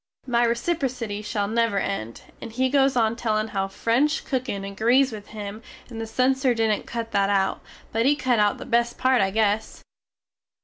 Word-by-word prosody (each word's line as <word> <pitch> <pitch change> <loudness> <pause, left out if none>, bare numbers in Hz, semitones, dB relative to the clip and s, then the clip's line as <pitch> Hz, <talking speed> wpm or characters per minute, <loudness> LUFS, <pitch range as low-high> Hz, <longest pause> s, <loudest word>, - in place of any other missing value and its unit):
My 240 -2 +2
reciprocity 240 -5 -2
shall 210 -1 -2
never 230 -1 +1
end. 115 - -3 0.2
And - - -7
he 260 +3 +1
goes 270 -1 +3
on 225 -2 +2
tellin 220 -2 -1
how 195 -2 -1
french 245 +9 0
cookin 255 -7 -2
agrees 235 +7 +2
with 210 -2 -8
him 210 0 -7 0.3
and 225 -1 -6
the 225 - -4
censer 255 +2 +2
didnt 220 -2 0
cut 230 -1 -4
that 195 0 +2
out, 195 -1 +1 0.3
but 225 +3 +1
he 290 - +4
cut 255 -5 +1
out 205 -1 +2
the - - -8
best 235 0 +1
part 255 -2 +3
I 195 - +2
guess. 215 +1 0
230 Hz, 180 wpm, -24 LUFS, 205-255 Hz, 0.3 s, he